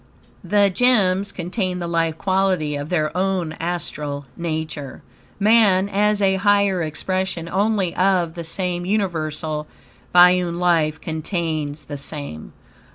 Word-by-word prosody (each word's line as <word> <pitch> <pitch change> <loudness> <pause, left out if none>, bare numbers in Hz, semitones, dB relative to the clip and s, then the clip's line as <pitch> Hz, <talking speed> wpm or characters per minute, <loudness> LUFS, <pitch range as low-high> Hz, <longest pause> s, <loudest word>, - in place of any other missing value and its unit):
The 205 -1 +3
gems 200 -4 +2
contain 180 +1 -3
the 175 -1 -4
life 165 -1 0
quality 185 -5 0
of 145 +1 -5
their 155 -3 0
own 185 -3 0
astral 150 -4 -4
nature. 155 -4 -5 0.4
Man, 205 -3 +4
as 205 +1 +2
a 190 0 +3
higher 200 -2 +2
expression, 180 +2 -3
only, 195 -1 0
of 185 -3 +2
the 170 -1 -6
same 175 +1 -1
universal 155 -6 -2 0.5
biune 180 -1 +5
life, 165 -3 +2
contains 160 -2 -3
the 145 - -7
same. 140 - -7
175 Hz, 120 wpm, -21 LUFS, 155-195 Hz, 0.5 s, biune